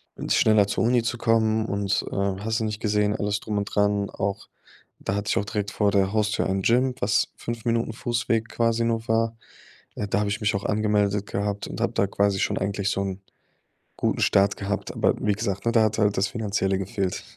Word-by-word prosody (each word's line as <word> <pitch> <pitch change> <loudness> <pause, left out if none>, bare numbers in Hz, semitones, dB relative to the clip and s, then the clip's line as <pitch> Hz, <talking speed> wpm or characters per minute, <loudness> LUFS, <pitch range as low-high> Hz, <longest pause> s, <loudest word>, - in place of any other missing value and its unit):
n - - -6
schneller 110 -2 +5
zur 105 - 0
Uni 120 0 +3
zu 115 +1 -2
kommen. 110 -1 +2
Und, 100 -1 0
äh, - - -5
hast 100 +3 -1
du - - -2
nicht 105 -1 -3
gesehen, 105 -1 +1
alles 105 0 -1
drum 105 -1 -3
und 100 - -2
dran. 100 -1 +1
Auch 100 0 -3 0.5
da - - -3
hatte 100 +1 -2
ich - - +1
auch 100 - 0
direkt 105 -1 -2
vor 100 0 +1
der 95 -1 +2
Haustür 105 -1 +1
ein 95 0 -1
Gym, 125 +3 +2
was 100 0 +1
5 115 -1 -5
Minuten 115 -1 0
Fußweg 115 -1 -1
quasi 115 0 +1
nur 115 0 -1
war. 115 0 +1 0.6
Ja, 105 - -3
da 100 - 0
habe 105 -1 0
ich 105 - -3
mich 105 0 +1
auch 100 - -3
angemeldet 105 -1 +1
gehabt 100 0 -3
und - - -7
habe - - 0
da - - +2
quasi 100 0 +1
schon - - 0
eigentlich 100 0 -1
so 100 - 0
'n 95 0 -4 0.8
guten - - 0
Start 100 +1 +3
gehabt. 100 0 -3
Aber - - +2
wie 105 - +1
gesagt, 100 -1 -3
ne, 115 - +3
da 115 -1 +4
hat 110 0 0
halt 105 -2 +2
das 95 +1 +2
Finanzielle 100 -3 -1
gefehlt. 95 -1 -3
105 Hz, 220 wpm, -25 LUFS, 100-110 Hz, 0.8 s, schneller